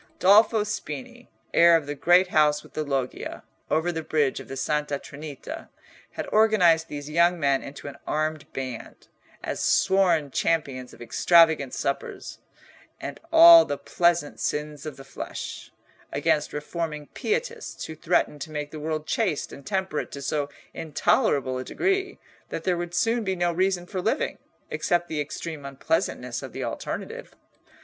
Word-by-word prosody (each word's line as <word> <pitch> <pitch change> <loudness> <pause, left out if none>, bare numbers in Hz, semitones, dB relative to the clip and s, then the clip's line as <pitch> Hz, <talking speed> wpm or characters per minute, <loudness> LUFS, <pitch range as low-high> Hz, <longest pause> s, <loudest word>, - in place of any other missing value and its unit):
Dolfo 210 +3 +5
Spini, 245 +4 -6 0.3
heir 170 0 +7
of 155 - -5
the 145 - -3
great 175 +5 +4
house 150 -2 +3
with - - -17
the 155 - -2
loggia, 135 -3 -3 0.3
over 160 +3 +1
the 160 -1 -3
bridge 150 -3 0
of - - -10
the 135 - -7
Santa 150 +1 -1
Trinita, 140 0 -9 0.4
had - - -4
organised 180 -7 +4
these 145 -2 -7
young 170 +3 +3
men 140 -2 +2
into 140 +1 -9
an 140 -1 -8
armed 155 0 -2
band, 130 -3 -7 0.3
as - - -3
sworn 175 -7 +3
champions 135 -7 -1
of - - -11
extravagant 160 -1 +4
suppers 140 - -4 0.6
and - - -6
all 330 0 +10
the 145 - -3
pleasant 170 -2 +1
sins 150 0 -3
of 150 - -7
the 135 - -10
flesh, - - -7 0.4
against 150 - +1
reforming 150 0 -4
pietists 475 +3 -3
who 160 - -7
threatened 160 -3 0
to 160 - -5
make 150 -1 -5
the 155 - -7
world 155 0 -3
chaste 185 -8 -1
and 140 - -11
temperate 190 -6 -2
to 140 - -7
so 145 +1 -1 0.2
intolerable 140 -4 +1
a - - -4
degree 385 - -1 0.3
that - - -5
there 180 - +1
would 175 0 -4
soon 230 +4 +1
be 190 -2 -1
no 175 -1 +1
reason 180 0 0
for 185 0 -4
living, 220 - -1 0.3
except 175 -2 0
the 155 -2 -1
extreme 155 +1 -6
unpleasantness 140 - -2
of - - -8
the - - -4
alternative. 485 +2 -5
160 Hz, 155 wpm, -25 LUFS, 145-185 Hz, 0.6 s, all